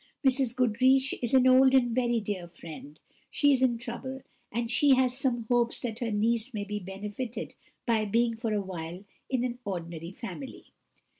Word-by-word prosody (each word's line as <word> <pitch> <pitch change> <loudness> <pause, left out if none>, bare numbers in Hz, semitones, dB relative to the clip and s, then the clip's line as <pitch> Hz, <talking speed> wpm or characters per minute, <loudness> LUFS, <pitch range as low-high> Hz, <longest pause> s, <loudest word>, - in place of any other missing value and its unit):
Mrs. 260 -2 +2
Goodriche 255 +2 +3
is 240 +1 +1
an 260 -1 +6
old 260 +1 +6
and 245 -3 +3
very 240 -1 +1
dear 200 -4 -4
friend; 160 -3 -11 0.3
she 290 -1 +3
is 265 -2 +2
in 245 -3 +3
trouble, 255 +3 -6 0.3
and 235 +1 -2
she 275 +2 +5
has 255 -1 +2
some 255 -3 0
hopes 240 -1 +2
that 230 -2 -4
her 235 - -2
niece 225 +3 0
may 205 - -2
be 210 +1 -4
benefited 205 +5 -6 0.3
by 225 -3 +2
being 230 +2 +1
for 225 0 -3
a 210 -1 +1
while 180 0 -7 0.2
in 255 -2 0
an 245 -1 -3
orderly 170 -4 -5
family. 230 +6 -9
235 Hz, 175 wpm, -29 LUFS, 205-255 Hz, 0.3 s, an